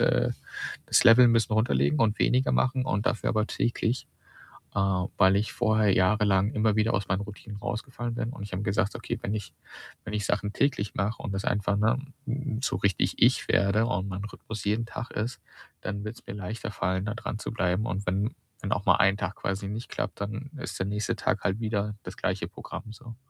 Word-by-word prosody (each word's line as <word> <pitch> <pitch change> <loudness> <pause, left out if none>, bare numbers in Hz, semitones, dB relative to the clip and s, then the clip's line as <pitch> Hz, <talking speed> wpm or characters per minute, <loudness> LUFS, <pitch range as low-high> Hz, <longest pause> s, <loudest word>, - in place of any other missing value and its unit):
äh - - +3 0.6
das - - +4
Level 120 +1 +9
'n 115 - +6
bisschen 115 -1 +2
runterlegen 75 - +2
und 110 -2 +2
weniger 130 +1 +3
machen 130 0 +2
und 105 -3 -1
dafür - - +1
aber 110 -1 +1
täglich, 120 0 -1 0.7
äh, - - 0 0.4
weil 95 0 +6
ich 105 +2 0
vorher 110 -2 +3
jahrelang 100 +1 +3
immer 110 -1 +2
wieder 110 +2 +2
aus 95 -1 0
meinen 95 +1 +1
Routinen 105 0 -8
rausgefallen 120 +1 -4
bin 115 0 -2
und 105 - -8
ich 100 - -7
habe 95 - -2
gesagt: 100 0 +1
„Okay, - - -4
wenn 100 - -1
ich 105 -3 -5 0.5
wenn 105 - -5
ich 105 -1 -1
Sachen 105 0 0
täglich 130 -8 +1
mache 105 +3 -1
und 100 - -3
das 95 - -2
einfach 105 0 +1
ne, 110 +5 +3 0.3
hm, 130 -2 -2
so - - 0
richtig 100 -3 +1
ich - - +4
werde 105 +3 +3
und 100 -5 -1
mein 95 +2 -4
Rhythmus 105 0 -7
jeden 110 +3 +1
Tag 120 - -6
ist, 120 +4 -3 0.4
dann 100 0 -3
wird's 110 +2 -8
mir - - -5
leichter 105 +2 -5
fallen, 95 0 -1
da 105 - -2
dranzubleiben 105 -4 -1
und 95 0 -3
wenn 100 +6 0 0.3
wenn 100 - -3
auch 100 - 0
mal - - +7
1 100 +1 +4
Tag 95 -1 -3
quasi 100 0 -3
nicht 110 +4 -5
klappt, - - -3
dann, 110 +7 -5
äh, 145 - -7
ist - - -5
der 95 - -1
nächste 105 +1 -1
Tag - - 0
halt 95 +4 0
wieder 105 -2 -1
das - - -7
gleiche - - -1
Programm 110 - -8
so.“ 115 -1 -11
105 Hz, 210 wpm, -28 LUFS, 100-115 Hz, 0.7 s, Level